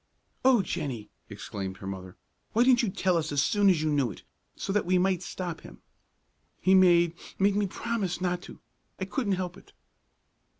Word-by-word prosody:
"O 255 -6 +5
Jennie!" 125 - -4 0.2
exclaimed 95 -1 -6
her 105 - -10
mother, 95 0 -7 0.4
"why 230 - +4
didn't 255 0 +5
you 230 - 0
tell 185 -1 +1
us 160 - -2
as 145 - 0
soon 205 -1 +3
as 165 -5 +2
you 155 - +1
knew 140 -4 +2
it, 100 - -10 0.3
so 195 - -3
that 210 -3 +1
we 185 0 +3
might 185 -1 +2
stop 175 -2 -5
him?" - - -13 0.8
"He 190 - +3
made 175 -3 +5 0.2
made 200 +1 +3
me 205 -1 +1
promise 195 -3 -2
not 180 -1 -1
to! - - -12 0.4
I 190 - -2
couldn't 205 +1 -1
help 180 -1 -3
it." - - -18
185 Hz, 185 wpm, -28 LUFS, 155-195 Hz, 0.8 s, O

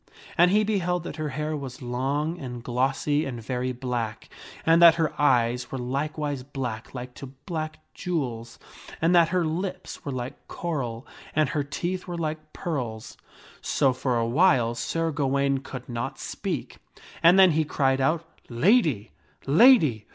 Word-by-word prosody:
And 175 0 +5
he 210 +3 +4
beheld 180 -5 0
that 160 - -7
her 155 -1 -2
hair 150 +3 -3
was 135 -3 -7
long 140 +6 -2
and 125 -3 -7
glossy 135 +4 0
and 125 -5 -5
very 125 +2 -2
black, 120 -3 -4 0.4
and 165 +1 +5
that 170 -2 +9
her 160 -3 0
eyes 125 -3 +2
were 135 - -3
likewise 145 +2 -2
black 125 -4 -6
like 125 0 -6
to 135 - -9 0.2
black 155 -2 -4 0.2
jewels, 120 -10 -3 0.4
and 165 +2 +3
that 170 -2 +5
her 180 -1 +1
lips 180 +3 -4
were 140 - -4
like 130 +2 -6
coral, 135 -8 -4 0.3
and 155 -3 +3
her 150 - 0
teeth 175 +7 -4
were 175 -1 -4
like 155 -1 -4
pearls. 125 - -4 0.5
So, 135 -2 +2
for 125 -1 -1
a 115 - +1
while, 125 -3 +3
Sir 165 +6 -1
Gawaine 140 -1 +1
could 130 -1 -9
not 120 -1 -4
speak, - - -5 0.4
and 170 +3 +7
then 190 -2 +7
he 160 +1 +2
cried 135 -3 +1
out, 160 +5 +1 0.2
" - - -29 0.2
Lady! 155 - +3 0.3
lady 155 - +5
140 Hz, 160 wpm, -26 LUFS, 125-165 Hz, 0.5 s, that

